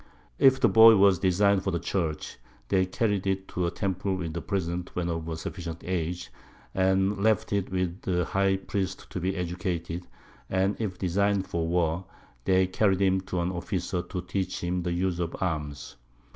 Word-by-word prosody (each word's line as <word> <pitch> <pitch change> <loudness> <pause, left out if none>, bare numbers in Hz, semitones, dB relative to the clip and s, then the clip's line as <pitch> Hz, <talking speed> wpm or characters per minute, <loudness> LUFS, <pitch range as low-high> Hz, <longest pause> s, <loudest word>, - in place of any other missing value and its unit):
If 135 0 +6
the - - +5
Boy 115 0 +8
was 100 -2 +5
design'd 95 +1 +3
for 95 - 0
the 85 - 0
Church, 80 -4 -3 0.3
they 95 -2 +3
carried 100 -1 0
it 95 0 -1
to 90 -1 -1
a - - +1
Temple 95 +1 -2
with 85 -2 -5
Presents, 90 -2 -2
when 85 -1 -1
of 85 -1 -3
a 80 - -3
sufficient 85 0 -6
Age, 85 -7 -3 0.4
and 95 +1 +2
left 110 -1 +2
it 100 -2 -1
with 90 -1 -2
the 90 -2 0
High 95 +1 +1
Priest 95 -1 -4
to - - -3
be 95 +2 -1
educated; 90 -1 -3 0.4
and 95 +2 +1
if 105 -5 -3
design'd 100 +2 +1
for 85 -2 -2
War, 85 +1 0 0.4
they 95 0 +4
carried 95 +1 +2
him 95 -1 +3
to 90 - 0
an 85 +1 -1
Officer 90 0 -2
to 90 +1 -5
teach 95 0 -3
him 90 +1 -1
the 90 0 -2
Use 90 0 -1
of 85 -1 -2
Arms. 75 -8 -3
90 Hz, 180 wpm, -27 LUFS, 85-95 Hz, 0.4 s, Boy